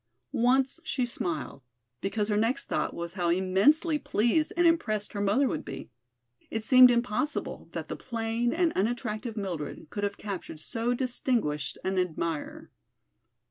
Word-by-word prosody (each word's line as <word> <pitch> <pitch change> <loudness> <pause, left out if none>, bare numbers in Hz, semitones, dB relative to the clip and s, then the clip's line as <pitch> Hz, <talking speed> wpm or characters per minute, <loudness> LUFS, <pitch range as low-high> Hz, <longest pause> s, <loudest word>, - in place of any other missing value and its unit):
Once 260 +5 +2
she 280 -6 -1
smiled, 160 - -4 0.4
because 205 +1 -1
her 210 - +1
next 225 +5 +1
thought - - -1
was 170 0 -6
how 175 -3 0
immensely 200 - +3
pleased 240 +9 +1
and 345 - +4
impressed 215 -11 +1
her 205 - -2
mother 210 +8 +3
would - - -2
be. 135 -3 -8 0.6
It 220 - -3
seemed 255 +2 +8
impossible 245 +4 -1
that - - -4
the - - -4
plain 230 0 -1
and 335 -1 +2
unattractive 220 +1 -2
Mildred 170 -5 -5
could 205 - -4
have 200 0 -1
captured 195 -6 -6
so 235 +8 -1
distinguished 235 - -1
an 190 0 0
admirer. 165 -3 -3
220 Hz, 145 wpm, -28 LUFS, 185-250 Hz, 0.6 s, seemed